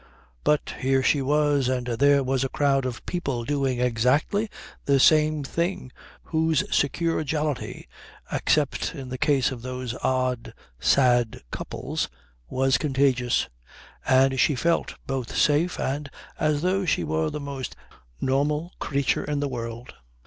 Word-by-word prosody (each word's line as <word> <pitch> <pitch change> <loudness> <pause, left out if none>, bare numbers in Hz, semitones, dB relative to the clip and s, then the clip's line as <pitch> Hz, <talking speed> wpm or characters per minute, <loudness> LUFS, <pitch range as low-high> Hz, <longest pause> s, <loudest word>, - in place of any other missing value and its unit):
But 150 0 +1
here 135 0 +2
she 140 +1 +3
was, 145 -1 +2
and 125 -1 -1
there 140 +4 +3
was 130 0 0
a 135 - -1
crowd 135 -2 +1
of 120 -2 -7
people 140 -9 -2
doing 135 -2 0
exactly 125 - +1 0.4
the 140 -1 +3
same 155 +1 +4
thing 170 -1 -2 0.3
whose 160 -2 +1
secure 165 +3 +1
jollity, 150 - -3 0.4
except 150 +1 0
in 135 -3 -7
the 130 0 -5
case 135 -4 +2
of 125 -3 -6
those 125 -1 -4
odd, 130 -2 -1 0.2
sad 120 - +3
couples, - - -4 0.4
was 130 -1 +2
contagious, 130 -3 +1 0.6
and 135 0 +3
she 145 - +3
felt 165 +6 0
both 135 -3 -3
safe 155 +4 +2
and 140 +2 -2 0.3
as 150 0 +1
though 190 +2 +1
she 150 - +1
were 80 0 0
the - - -5
most 140 -2 -5 0.4
normal 150 +5 0
creature 140 -2 0
in 145 -1 -2
the 145 - 0
world. 120 -1 -6
135 Hz, 140 wpm, -25 LUFS, 125-150 Hz, 0.6 s, same